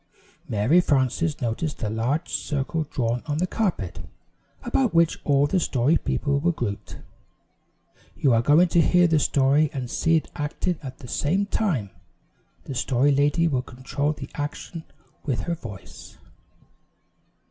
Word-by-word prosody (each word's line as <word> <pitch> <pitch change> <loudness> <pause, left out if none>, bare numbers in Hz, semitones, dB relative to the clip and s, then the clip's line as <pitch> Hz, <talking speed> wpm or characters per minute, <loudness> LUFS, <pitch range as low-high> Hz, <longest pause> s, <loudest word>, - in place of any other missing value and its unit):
Mary 110 +12 +3
Frances 145 +1 +1
noticed 125 +5 -3
a - - 0
large 120 +9 -1
circle 150 +2 -2
drawn 120 -1 -1
on 145 -1 -1
the 175 - +1
carpet, 180 - -2 0.6
about 240 -4 0
which 165 -1 +3
all 140 -1 +3
the 185 +6 +1
Story 140 -1 +2
People 140 -2 0
were 175 +4 +2
grouped. 115 -10 -5 1.2
"You 135 -4 +3
are 115 - +4
going 150 +8 +5
to 170 - +4
hear 180 +3 +4
the 160 -2 +3
story 145 +2 +3
and 125 -3 -5
see 165 0 +2
it 160 - -1
acted 155 +4 -2
at 130 -3 -8
the 130 - -11
same 180 +11 0
time. 170 - -1 0.7
The - - -6
Story 130 +2 +2
Lady 145 +4 +2
will 135 -5 0
control 130 +3 -3
the 145 -3 -8
action 150 +3 -5 0.4
with 135 -5 -1
her 170 - -2
voice." 115 - -10
145 Hz, 145 wpm, -24 LUFS, 130-165 Hz, 1.2 s, going